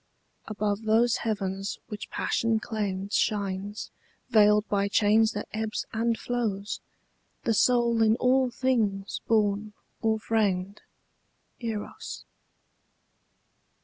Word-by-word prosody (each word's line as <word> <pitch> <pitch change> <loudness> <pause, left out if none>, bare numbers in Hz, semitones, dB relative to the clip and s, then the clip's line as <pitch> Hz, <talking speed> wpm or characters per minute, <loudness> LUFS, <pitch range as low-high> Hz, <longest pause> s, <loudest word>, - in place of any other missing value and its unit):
Above 210 0 -2
those 225 +2 +3
heavens 195 -3 -2
which 205 -3 -7
passion 230 -1 0
claimed 205 -3 -3
Shines, 200 0 -1 0.4
veiled 210 -1 +5
by 200 -1 +1
change 215 +2 +3
that 210 - -4
ebbs 220 0 -2
and 230 +1 +1
flows, 215 -5 -2 0.6
The 230 - +2
soul 235 0 +3
in 220 0 +5
all 255 +1 +3
things 220 -6 0
born 210 -1 +1 0.3
or 220 -1 +2
framed, 205 -3 0 0.8
Eros. 225 -3 -5
215 Hz, 100 wpm, -27 LUFS, 205-225 Hz, 0.8 s, veiled